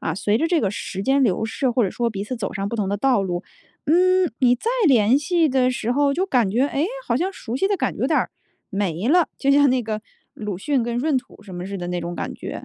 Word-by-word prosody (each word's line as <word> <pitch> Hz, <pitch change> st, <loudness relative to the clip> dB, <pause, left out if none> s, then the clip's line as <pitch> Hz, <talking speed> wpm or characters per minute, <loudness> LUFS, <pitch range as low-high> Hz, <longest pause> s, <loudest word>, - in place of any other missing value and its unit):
啊， 160 Hz, -, -2 dB
随 205 Hz, +3 st, +1 dB
着 325 Hz, -, +1 dB
这 340 Hz, -2 st, +2 dB
个 195 Hz, -, 0 dB
时 195 Hz, -2 st, -5 dB
间 270 Hz, +5 st, +2 dB
流 220 Hz, -3 st, +1 dB
逝， 245 Hz, +3 st, -1 dB
或 240 Hz, +1 st, +1 dB
者 190 Hz, -, -1 dB
说 235 Hz, +3 st, -1 dB
彼 200 Hz, -2 st, -4 dB
此 255 Hz, +4 st, -4 dB
走 205 Hz, -4 st, -4 dB
上 200 Hz, 0 st, -3 dB
不 235 Hz, -, -5 dB
同 205 Hz, -3 st, -1 dB
的 200 Hz, -, 0 dB
道 250 Hz, -1 st, +2 dB
路。 175 Hz, -1 st, -3 dB, 0.4 s
嗯， 365 Hz, +2 st, +3 dB
你 245 Hz, -2 st, +5 dB
再 440 Hz, -, -2 dB, 0.2 s
联 245 Hz, -2 st, +5 dB
系 325 Hz, +2 st, +2 dB
的 255 Hz, -1 st, +2 dB
时 235 Hz, -2 st, -2 dB
候， 285 Hz, +1 st, +2 dB
就 365 Hz, +6 st, 0 dB
感 245 Hz, -, +2 dB
觉， 235 Hz, +6 st, +1 dB
哎， 290 Hz, +1 st, -1 dB, 0.2 s
好 -, -, +1 dB
像 365 Hz, +8 st, -1 dB
熟 245 Hz, -8 st, -5 dB
悉 385 Hz, -, +1 dB
的 405 Hz, -, +1 dB
感 -, -, -1 dB
觉 -, -, -9 dB
有 -, -, +2 dB
点 -, -, +2 dB
儿 -, -, -1 dB, 0.4 s
没 195 Hz, 0 st, -2 dB
了。 345 Hz, +3 st, +4 dB
就 275 Hz, -, +1 dB
像 285 Hz, -1 st, +5 dB
那 255 Hz, -1 st, +1 dB
个 215 Hz, -1 st, -4 dB, 0.3 s
鲁 210 Hz, -4 st, -5 dB
迅 275 Hz, +4 st, 0 dB
跟 235 Hz, 0 st, -2 dB
润 290 Hz, +2 st, +1 dB
土 250 Hz, -4 st, -7 dB
什 195 Hz, -3 st, -10 dB
么 175 Hz, 0 st, -5 dB
似 195 Hz, 0 st, -5 dB
的 175 Hz, -, -5 dB
那 180 Hz, 0 st, -2 dB
种 175 Hz, 0 st, -5 dB
感 -, -, -4 dB
觉。 -, -, -7 dB
240 Hz, 295 characters per minute, -22 LUFS, 205-280 Hz, 0.4 s, 你